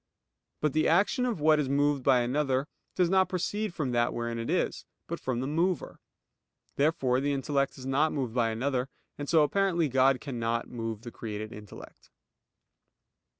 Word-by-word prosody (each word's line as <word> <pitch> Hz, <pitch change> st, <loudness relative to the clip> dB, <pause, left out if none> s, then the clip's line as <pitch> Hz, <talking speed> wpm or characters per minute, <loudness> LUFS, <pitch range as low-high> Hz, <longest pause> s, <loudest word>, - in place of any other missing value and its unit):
But 150 Hz, -2 st, +1 dB
the 155 Hz, -, +2 dB
action 205 Hz, +9 st, +3 dB
of 230 Hz, -9 st, -2 dB
what 155 Hz, 0 st, +4 dB
is 140 Hz, -3 st, -1 dB
moved 145 Hz, 0 st, +2 dB
by 125 Hz, -1 st, +4 dB
another 135 Hz, +2 st, 0 dB, 0.3 s
does 180 Hz, -, +3 dB
not 190 Hz, 0 st, +3 dB
proceed 205 Hz, +3 st, -2 dB
from 135 Hz, -5 st, -1 dB
that 120 Hz, 0 st, +1 dB
wherein 115 Hz, 0 st, -3 dB
it 115 Hz, -, -4 dB
is; -, -, 0 dB, 0.2 s
but -, -, -5 dB
from 125 Hz, -2 st, -2 dB
the 130 Hz, -, -2 dB
mover. 170 Hz, +4 st, -1 dB, 0.8 s
Therefore 140 Hz, -4 st, +2 dB
the 145 Hz, +1 st, 0 dB
intellect 140 Hz, 0 st, -1 dB
is 130 Hz, -, -9 dB
not 140 Hz, +4 st, +2 dB
moved 130 Hz, -6 st, -2 dB
by 120 Hz, -2 st, +2 dB
another; 125 Hz, +3 st, -1 dB, 0.3 s
and 145 Hz, -, -4 dB
so 160 Hz, -2 st, +5 dB
apparently 175 Hz, +1 st, +1 dB
God 130 Hz, 0 st, +3 dB
cannot 115 Hz, -4 st, -2 dB
move 115 Hz, -2 st, -5 dB
the 120 Hz, -, -7 dB
created 110 Hz, -1 st, -6 dB
intellect. 105 Hz, -1 st, -12 dB
135 Hz, 170 wpm, -29 LUFS, 120-155 Hz, 0.8 s, so